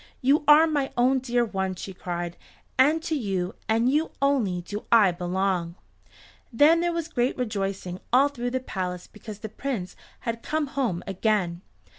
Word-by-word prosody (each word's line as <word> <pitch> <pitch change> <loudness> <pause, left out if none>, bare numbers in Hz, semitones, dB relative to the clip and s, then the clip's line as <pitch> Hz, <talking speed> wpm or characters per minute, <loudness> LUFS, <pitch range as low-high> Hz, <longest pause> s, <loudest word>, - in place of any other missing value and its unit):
"You 280 +4 +3
are 300 +2 +8
my 290 -4 -1
own 255 +2 +4
dear 245 -1 +1
one," 190 -3 -2
she 190 +2 -7
cried, 175 -1 -4 0.4
"and 300 +5 +4
to 325 - -2
you 195 -8 -1 0.2
and 225 +2 +3
you 300 +5 +2
only 245 -11 +1
do 205 +4 -7
I 215 -5 +6
belong." 180 -1 -1 0.8
Then 295 +8 +5
there 345 0 +1
was 335 -2 -3
great 245 -6 0
rejoicing 195 -6 -3
all 265 +4 +6
through 245 -3 -3
the 260 +1 -1
palace 180 -7 -4
because 210 0 -10
the 220 +1 -7
Prince 215 -5 -4 0.3
had 230 -1 -3
come 310 +3 -1
home 230 -11 -1
again. 190 -3 0
225 Hz, 165 wpm, -26 LUFS, 185-275 Hz, 0.8 s, are